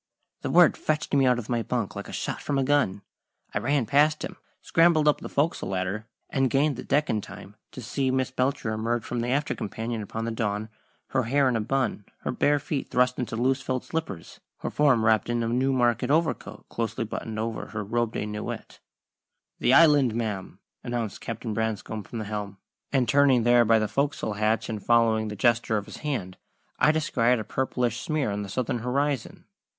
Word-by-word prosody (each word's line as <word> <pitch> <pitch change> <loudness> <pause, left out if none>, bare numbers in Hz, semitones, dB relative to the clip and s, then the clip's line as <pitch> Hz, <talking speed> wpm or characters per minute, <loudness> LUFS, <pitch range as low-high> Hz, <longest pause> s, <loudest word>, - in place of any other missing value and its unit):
The - - -3
word - - +6
fetched 155 -1 -2
me 135 -2 +4
out 125 -1 +4
of 120 -3 -5
my 120 -1 0
bunk 115 -3 -2
like - - -6
a - - -7
shot - - -3
from 145 - -1
a 135 - +2
gun. 130 -9 +1 0.5
I - - 0
ran 140 0 +1
past 150 +4 +3
him, - - -9 0.2
scrambled 165 -2 +3
up 150 - +3
the - - -6
fo'c's'le 150 +4 0
ladder, 95 +4 -2 0.2
and 135 -1 +2
gained 140 +3 +2
the - - -7
deck 150 +2 +1
in 110 - 0
time 100 0 -11 0.2
to 130 - -8
see 130 +3 -1
Miss 130 0 0
Belcher 130 -2 -1
emerge 115 +2 -1
from 120 - -3
the 120 - -1
after 140 +4 0
companion 110 +2 -4
upon 110 +2 -4
the 115 - -2
dawn, 110 -1 -2 0.4
her 130 -3 0
hair 135 +3 +3
in 125 - +1
a 115 - +1
"bun," 130 -3 -1 0.2
her - - -2
bare 145 0 +2
feet 145 0 -3
thrust 125 0 +2
into 120 -3 -3
loose 130 +3 +1
felt 130 -1 -2
slippers, 160 - -5 0.2
her - - -3
form 135 -7 +3
wrapped 110 0 +3
in 120 -1 0
a - - -1
Newmarket 125 0 +1
overcoat 160 +2 -1
closely 115 0 -3
buttoned 110 0 -5
over 110 0 -3
her 105 -1 -4
robe 115 +2 -1
de - - -2
nuit. 105 0 -6 0.8
"The 130 - +4
Island, 145 -8 +6
ma'am!" 105 -5 -3 0.3
announced 120 -4 -3
Captain 115 -1 -4
Branscome 110 0 -2
from 115 - -8
the 110 - -4
helm; 105 -1 -5 0.3
and, 130 -3 +2
turning 140 -4 +4
there 120 0 +5
by 115 +1 +5
the 110 -1 +1
fo'c's'le 140 -5 -1
hatch 110 +1 +1
and 110 -3 -5
following 115 -2 +3
the 105 - -5
gesture 115 +1 +2
of 100 - -3
his 110 - -10
hand, 120 -12 -4 0.4
I 150 - +5
descried 125 -6 +2
a 110 - -3
purplish 120 0 -1
smear 150 -6 -1
on 100 +1 -2
the 100 - -6
southern 120 +3 -1
horizon. 135 +1 -2
120 Hz, 200 wpm, -26 LUFS, 110-135 Hz, 0.8 s, word